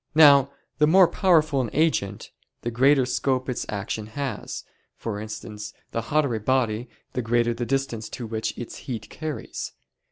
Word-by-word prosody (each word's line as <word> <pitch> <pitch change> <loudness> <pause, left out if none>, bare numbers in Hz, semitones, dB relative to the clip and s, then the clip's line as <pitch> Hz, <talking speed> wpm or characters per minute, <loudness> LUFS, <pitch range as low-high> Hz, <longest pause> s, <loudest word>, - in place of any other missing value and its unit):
Now 140 -3 +8 0.3
the 150 - +5
more 185 +3 +7
powerful 160 -6 +3
an 120 - -2
agent, 135 -11 0 0.3
the 120 - -2
greater 135 +3 +4
scope 130 0 0
its 125 - -3
action 105 +1 -3
has: 130 0 -4 0.3
for 105 -3 -4
instance, 105 0 -7 0.2
the 115 - -1
hotter 145 -4 +2
a 110 - -1
body, 120 0 0 0.2
the 125 - -1
greater 120 0 +2
the 120 0 -4
distance 135 -5 -1
to 120 - -6
which 110 0 -3
its 120 - -6
heat 110 -4 -5
carries. 155 -2 -5
125 Hz, 160 wpm, -25 LUFS, 110-140 Hz, 0.3 s, Now